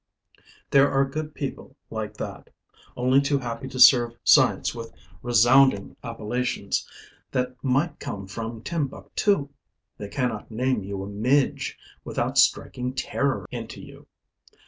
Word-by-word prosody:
There 140 0 +6
are 135 0 +3
good 150 +2 -5
people 140 - -6 0.2
like - - -5
that, - - -7 0.5
only 130 +2 +4
too 140 0 +1
happy 120 -1 -5
to 130 0 -7
serve 120 -2 +7
science - - +4
with 115 -1 -8 0.3
resounding 120 -2 +4
appellations 115 -2 -2 0.4
that 125 0 -2
might 145 +4 0
come 100 -1 -6
from 115 +3 -6
Timbuktu; 155 +1 -1 0.5
they 105 - -5
cannot 125 -4 -2
name 125 -1 -1
you 100 0 -5
a - - -6
midge 125 +7 0 0.3
without - - -1
striking 125 +1 +1
terror 135 +1 -1
into 115 -2 -7
you. - - -13
125 Hz, 125 wpm, -25 LUFS, 115-135 Hz, 0.5 s, serve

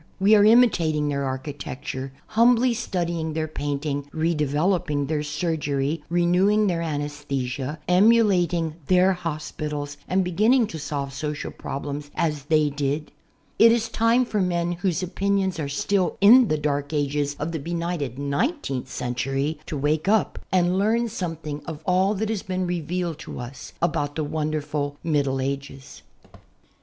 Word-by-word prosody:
We 200 +3 +5
are 205 -1 +7
imitating 175 -10 +4
their 140 -1 -1
architecture, 130 0 -5 0.2
humbly 240 +2 +4
studying 170 -8 -2
their 155 0 -1
painting, 145 -1 -3
redevelc^ping 150 -1 0
their 150 0 -1
surgery, 150 -1 -2
renewing 180 +5 +3
their 175 -4 0
anesthesia, 145 -3 -3
emulating 180 -5 +3
their 185 +1 +4
hospitals 150 -4 -5
and 190 +1 +2
beginning 220 +8 +3
to 160 - -6
solve 140 -2 -4
social 150 +1 -4
problems 145 +1 -5
as 150 -4 -1
they 155 -1 +2
did. 145 +1 -2 0.5
It 230 +1 +8
is 230 -1 +1
time 230 +3 +3
for 210 -3 -1
men 175 -1 0
whose 175 +1 -1
opinions 190 0 0
are 145 -2 -2
still 185 +6 0
in 235 +5 +8
the 155 - +1
dark 145 0 -2
ages 145 0 0
of 150 +3 -3
the 160 - -3
benighted 170 -4 -3
nineteenth 140 - -2
century 135 +5 -2
to 150 - -3
wake 150 +4 0
up 215 0 +2
and 180 0 +2
learn 230 +3 +2
something 165 -8 -5
of 160 -1 -6
all 190 +3 +2
that 215 +2 -2
has 220 -3 -1
been 185 0 -2
revealed 175 -1 -2
to - - -8
us 125 +2 -8
about 145 -3 0
the 155 - -1
wonderful 150 -1 -2
Middle 140 -5 +1
Ages. 135 0 -5
160 Hz, 145 wpm, -24 LUFS, 145-185 Hz, 0.5 s, It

